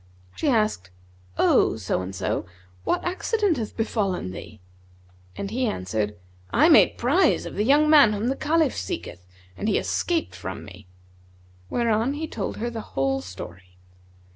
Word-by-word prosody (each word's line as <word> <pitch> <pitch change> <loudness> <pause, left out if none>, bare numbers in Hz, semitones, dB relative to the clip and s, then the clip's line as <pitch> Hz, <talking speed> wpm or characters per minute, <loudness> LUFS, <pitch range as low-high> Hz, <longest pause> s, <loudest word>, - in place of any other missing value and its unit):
She 300 - 0
asked, 215 - +1 0.5
'O - - +3
so - - -1
and 95 +1 -6
so, 95 - -2 0.4
what - - 0
accident 375 - 0
hath 220 -3 -5
befallen 200 - -1
thee?'; 110 +3 -10 0.8
and 200 0 -4
he 250 +2 0
answered, 105 - -2 0.3
'I - - +4
made - - +6
prize 80 - +2
of - - -6
the 205 - 0
young 290 +6 +4
man 290 -8 +7
whom 210 +3 -2
the 270 - 0
Caliph 310 -2 +1
seeketh 90 0 -6 0.3
and 210 - -2
he 205 - +2
escaped 340 -2 -1
from - - -7
me;' - - -13 0.8
whereupon 235 +2 +1
he 315 +2 -4
told 215 -9 -4
her 235 +2 -3
the 225 -1 -5 0.2
whole 135 0 +1
story. 90 -1 -10
215 Hz, 155 wpm, -24 LUFS, -, 0.8 s, man